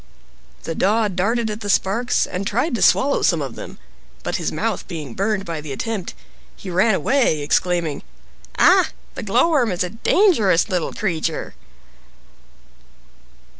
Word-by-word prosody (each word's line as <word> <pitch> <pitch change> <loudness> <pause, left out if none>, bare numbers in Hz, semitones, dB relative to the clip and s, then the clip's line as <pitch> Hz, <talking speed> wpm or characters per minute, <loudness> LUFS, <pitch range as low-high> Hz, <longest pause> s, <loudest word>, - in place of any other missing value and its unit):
The 165 - -3
Daw 210 +5 +1
darted 220 +5 0
at 210 +1 -6
the 205 - -5
sparks 215 +5 +1
and 195 +2 -4
tried 250 +10 0
to 235 - -2
swallow 280 +1 +3
some 170 - +2
of 135 -5 -4
them, - - -9 0.5
but - - -2
his - - -2
mouth - - -3
being 150 -7 -6
burned 200 - -1
by 165 -2 -4
the 150 -2 -8
attempt, 205 +5 -4 0.4
he 190 - -8
ran 190 +4 +3
away 250 - +1
exclaiming, 170 -1 0 0.6
"Ah, - - +5 0.2
the - - -6
Glowworm 245 - +2
is 180 0 -1
a 180 - -4
dangerous 225 - +3
little 180 -3 -1
creature!" 165 -5 -3
195 Hz, 145 wpm, -21 LUFS, 170-225 Hz, 0.6 s, Ah